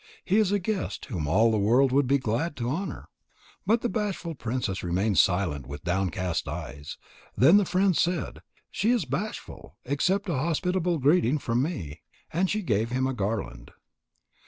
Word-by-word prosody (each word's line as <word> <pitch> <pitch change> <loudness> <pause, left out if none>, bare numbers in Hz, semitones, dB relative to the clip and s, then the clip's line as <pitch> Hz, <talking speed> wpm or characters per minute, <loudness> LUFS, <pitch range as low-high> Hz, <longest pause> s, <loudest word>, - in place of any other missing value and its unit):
He 195 - +2
is 205 -3 +2
a 205 - +3
guest 200 +1 -3
whom 85 - -4
all 110 +9 +4
the 110 - +1
world 125 +6 +4
would 140 0 +3
be 140 +2 +4
glad 135 +6 -2
to 120 -3 -3
honour." 190 +7 -4 0.6
But 225 +3 +3
the - - 0
bashful 195 -7 -3
princess 120 -7 -3
remained 95 +4 +1
silent 90 - +1
with 70 +2 -8
downcast 90 -1 -1
eyes. 70 +1 -6 0.4
Then 160 +10 +7
the 205 - +3
friend 185 0 +2
said: 175 +2 -1 0.3
"She 215 - 0
is 240 -8 +2
bashful. 165 - -6
Accept 185 +10 0
a 175 - -1
hospitable 170 +4 0
greeting 145 -1 +3
from 125 -3 0
me." 110 - -4 0.3
And 180 +3 +1
she 215 0 -1
gave 110 - 0
him 130 +2 0
a 135 - -1
garland. 95 - -3
135 Hz, 170 wpm, -27 LUFS, -, 0.6 s, Then